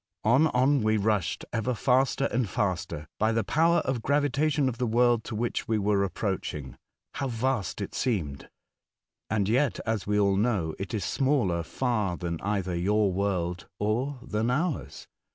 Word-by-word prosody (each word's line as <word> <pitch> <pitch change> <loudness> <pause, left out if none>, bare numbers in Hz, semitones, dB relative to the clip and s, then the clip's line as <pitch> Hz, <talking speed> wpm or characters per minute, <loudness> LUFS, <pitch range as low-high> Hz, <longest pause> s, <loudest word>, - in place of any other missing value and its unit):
On, 125 +8 +5
on 135 0 +3
we 110 0 +2
rushed, 105 -3 0
ever 120 +2 0
faster 130 +3 +2
and 120 -4 0
faster, 90 - -2
by 110 +1 +3
the 115 0 +1
power 165 +8 +3
of 130 -5 -2
gravitation 145 +2 +1
of 125 -1 -3
the 125 - +1
world 120 0 +3
to - - -5
which 120 +2 -2
we 110 - +1
were 100 -1 +2
approaching. 85 - -3 0.4
How 140 - -2
vast 120 -7 -1
it - - -5
seemed; 85 - -1
The - - -13
Ice - - -36
Island. 105 -2 +1
101 125 +6 +4
and 140 - -1
yefc, - - -7
as 110 -4 -1
we 105 0 +2
all 100 -1 +3
know, 100 -7 +1
it 100 +4 -4
is 100 -5 -2
smaller 130 -12 +1
far 105 -1 -1
than 85 -2 -4
either 95 -3 -1
your 100 +2 +2
world 90 -3 -1
or 120 +7 -1
than 115 -2 -1
ours. 155 +4 -2
110 Hz, 180 wpm, -27 LUFS, 95-125 Hz, 0.4 s, On